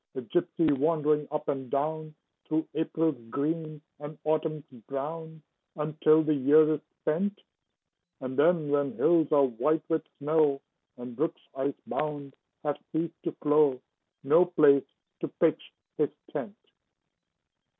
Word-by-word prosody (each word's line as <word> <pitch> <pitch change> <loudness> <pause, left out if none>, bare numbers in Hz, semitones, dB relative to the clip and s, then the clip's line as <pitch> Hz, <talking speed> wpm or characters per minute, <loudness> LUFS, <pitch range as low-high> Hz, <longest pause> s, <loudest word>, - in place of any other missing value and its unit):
A 130 - -3
gypsy 165 +2 +1
wandering 150 0 +1
up 150 +1 -4
and 135 -2 -3
down 155 +3 -2 0.3
Through 155 +1 0
April's 160 -4 -1
green 155 +3 -2 0.2
and 150 +1 -8
Autumn's 155 -1 -1 0.2
brown, 160 +3 -5 0.3
Until 155 +1 +3
the 155 0 +2
year 150 +3 +5
is 150 - -3 0.2
spent; 195 +7 -1 0.8
And 130 -2 -5
then, 155 0 +3
when 145 -1 +1
hills 165 -3 +3
are 145 -2 +5
white 150 +6 0
with 160 -1 +1 0.2
snow, 150 -1 +2 0.4
And 125 -1 -8
brooks, 160 +5 -2
ice 135 +1 -2
bound, 145 -2 -4 0.3
have 145 -1 -2
ceased 160 +1 -2
to - - 0
flow, 150 -3 +4 0.4
No 150 +6 +5
place 150 -6 +4 0.3
to - - -3
pitch - - +1 0.3
his - - +3 0.2
tent. - - -5
150 Hz, 130 wpm, -28 LUFS, 140-160 Hz, 0.8 s, year